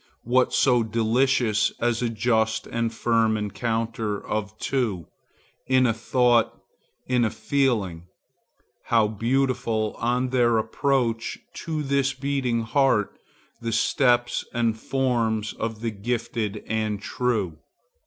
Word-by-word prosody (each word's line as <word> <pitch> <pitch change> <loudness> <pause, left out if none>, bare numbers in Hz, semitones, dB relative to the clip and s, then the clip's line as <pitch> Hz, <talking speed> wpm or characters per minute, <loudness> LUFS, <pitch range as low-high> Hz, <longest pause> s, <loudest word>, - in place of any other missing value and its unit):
What 125 +2 +2
so 125 -3 +3
delicious 115 0 +2
as 120 0 0
a 120 - 0
just 110 0 0
and 115 -1 -2
firm 115 -1 +1
encounter 110 0 -2
of 105 0 -3
two, 110 - -1 0.6
in 130 -1 +4
a 115 - +3
thought, 120 +1 +2 0.5
in 125 -1 +2
a 110 - +2
feeling? 105 -14 -1 0.8
How 115 -2 +3
beautiful, 115 0 0
on 125 +2 0
their 120 -2 +3
approach 115 0 0 0.2
to 155 -2 -4
this 135 -1 +1
beating 130 -4 -1
heart, 115 -3 +1 0.4
the 115 0 -2
steps 120 +1 +2
and 115 -2 +1
forms 115 -3 -1
of 110 -1 -4
the 115 -1 -1
gifted 110 -1 -3
and 110 -1 -1
the 100 - -17
true! 105 -11 -1
115 Hz, 120 wpm, -25 LUFS, 110-125 Hz, 0.8 s, in